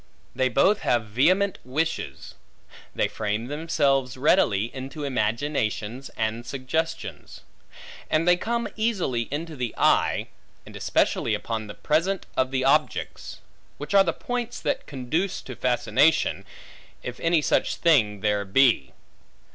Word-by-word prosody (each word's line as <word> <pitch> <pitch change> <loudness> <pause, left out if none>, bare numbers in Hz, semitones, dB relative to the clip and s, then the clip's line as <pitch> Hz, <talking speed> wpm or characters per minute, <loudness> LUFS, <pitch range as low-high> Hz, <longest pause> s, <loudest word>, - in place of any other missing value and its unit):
They 130 0 +2
both 190 - +3
have 120 -2 +1
vehement 175 - +2
wishes; 130 - -3 0.6
they - - +1
frame 105 +1 -3
themselves 140 -3 0
readily 120 - +2
into 135 +3 -6
imaginations 125 -1 -2
and 110 +1 -1
suggestions; 160 +6 -4 0.7
and 160 +2 +1
they 175 - +6
come 235 +6 -2
easily 185 - 0
into 155 +3 -4
the 125 -4 -4
eye, - - +2 0.4
especially - - 0
upon 110 -2 -4
the 100 - -8
present 170 +6 0
of 130 0 +1
the 130 0 -1
objects; 150 +3 0 0.4
which 145 +7 -6
are 195 -1 +7
the 170 - 0
points 245 +5 -4
that - - -2
conduce 150 +8 -2
to 130 - -8
fascination, 125 +5 +2 0.6
if 125 0 -6
any 165 -2 +2
such - - +1
thing 110 - +3
there 105 -1 +1
be. 100 - +3
135 Hz, 125 wpm, -25 LUFS, 115-165 Hz, 0.7 s, are